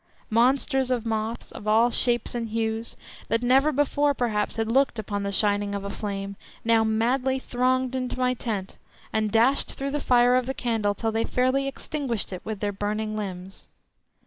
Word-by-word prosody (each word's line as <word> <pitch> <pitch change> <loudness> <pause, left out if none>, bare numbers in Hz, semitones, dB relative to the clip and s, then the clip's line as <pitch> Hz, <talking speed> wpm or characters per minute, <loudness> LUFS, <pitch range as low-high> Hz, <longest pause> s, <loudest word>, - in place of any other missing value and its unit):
Monsters 260 +3 +2
of 245 -3 0
moths, 225 +1 -3
of 210 - -9
all 225 +3 +4
shapes 240 -1 +1
and 235 -2 -3
hues, 225 +1 -2 0.3
that 230 +1 0
never 270 +5 +4
before 290 0 +1
perhaps 215 -5 -1
had 225 0 -1
looked 270 0 +2
upon 205 -1 -3
the 200 0 -2
shining 205 0 +2
of 200 - -4
a 200 - -4
flame, 200 -1 -4 0.3
now 225 -1 +4
madly 250 +4 +1
thronged 255 0 0
into 255 -1 -3
my 250 0 +2
tent, 210 -6 -4 0.4
and 215 -1 0
dashed 240 +6 +3
through 275 0 -4
the 295 - -1
fire 245 -2 +4
of 255 -1 +1
the 265 - -2
candle 220 -4 0
till 225 +1 -1
they 225 +1 0
fairly 255 +3 +1
extinguished 270 -7 -3
it 180 - -6
with 215 -3 -5
their 205 -1 0
burning 215 +2 -3
limbs. 190 -2 -7
230 Hz, 180 wpm, -25 LUFS, 215-255 Hz, 0.4 s, all